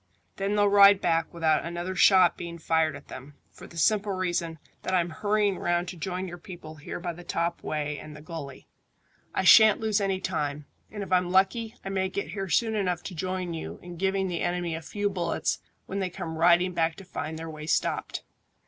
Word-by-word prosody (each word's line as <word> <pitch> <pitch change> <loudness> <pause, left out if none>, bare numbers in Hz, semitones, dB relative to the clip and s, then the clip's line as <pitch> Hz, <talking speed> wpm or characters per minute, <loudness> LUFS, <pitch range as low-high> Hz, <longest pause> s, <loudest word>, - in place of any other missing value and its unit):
Then 195 +1 -1
they'll 205 0 +4
ride 200 0 +7
back 165 -2 +1
without 160 -2 +1
another 175 +2 -4
shot 185 -3 +6
being 170 0 -7
fired 160 -1 +1
at - - -12
them, 140 +3 -10 0.2
for - - -13
the 170 - -13
simple 205 +3 +2
reason 175 -3 -2 0.2
that 185 - -1
I'm 175 -1 +1
hurrying 205 +1 +1
round 175 0 0
to - - -7
join 185 +2 -4
your 175 0 -8
people 165 -3 -10
here 145 - -6
by 175 0 -4
the 175 +2 -11
top 170 0 -2
way 150 -1 -3
and 150 -1 -10
the 150 - -11
gully. 155 -5 -8 0.7
I - - +1
shan't 220 +2 +8
lose 215 -2 +1
any 195 -1 0
time, 150 -5 -2 0.2
and 205 -1 -5
if 190 - -9
I'm 180 -1 +3
lucky 220 +5 +2
I - - -3
may 190 -1 0
get 200 +1 -4
here 195 -2 -4
soon 220 +7 +2
enough 180 -5 -1
to 190 - -6
join 185 +1 -3
you 160 - -6
in 175 0 -8
giving 190 +2 0
the 175 -2 -3
enemy 175 -1 -1
a 160 - -4
few 205 +5 -2
bullets 175 -4 -1 0.3
when 195 - -4
they 190 -2 -1
come 160 -2 -6
riding 175 +2 +4
back 165 -1 +1
to 195 - -12
find 160 -3 -5
their 165 +1 -6
way 155 0 -8
stopped." - - -1
175 Hz, 210 wpm, -27 LUFS, 165-195 Hz, 0.7 s, shan't